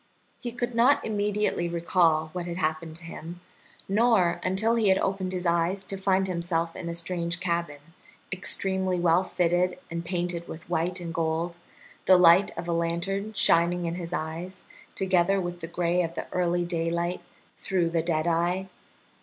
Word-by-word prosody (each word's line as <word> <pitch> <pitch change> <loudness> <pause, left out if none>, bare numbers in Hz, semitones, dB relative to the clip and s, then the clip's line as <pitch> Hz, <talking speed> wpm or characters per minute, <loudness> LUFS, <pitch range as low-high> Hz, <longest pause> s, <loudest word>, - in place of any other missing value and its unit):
He 240 - -5
could 240 +1 -3
not 240 +5 +4
immediately 205 -4 0
recall 165 -2 +2
what 180 -1 -4
had 170 0 -4
happened 160 -1 -2
to 170 - -6
him, 170 +1 -8 0.5
nor 205 -4 +3
until 195 +5 +1
he 230 -3 +2
had 190 - +5
opened 190 -1 -1
his 180 -1 -4
eyes 170 +3 +1
to 195 - -6
find 190 0 +1
himself 170 -2 -2
in 170 - -5
a 170 - -3
strange 170 0 -3
cabin, 170 -4 -2 0.5
extremely 190 -1 0
well 175 0 +4
fitted 180 -1 +1
and 170 0 -3
painted 175 -1 -2
with 160 0 -9
white 175 +2 -1
and 170 -1 -6
gold, 165 +1 -1 0.5
the 185 - +7
light 180 +2 +6
of 170 +1 -5
a 170 - 0
lantern 175 +5 -2
shining 175 -3 +3
in 165 - -2
his 170 -1 -6
eyes, 175 +3 -5 0.3
together 190 0 +2
with 175 -1 -4
the 165 - -6
gray 175 +1 0
of 170 -1 -3
the - - -4
early 175 -1 +1
daylight 170 +1 -1 0.3
through 175 -4 -1
the 165 -1 +1
dead 160 -1 0
eye. 175 +3 0
175 Hz, 170 wpm, -27 LUFS, 170-190 Hz, 0.5 s, the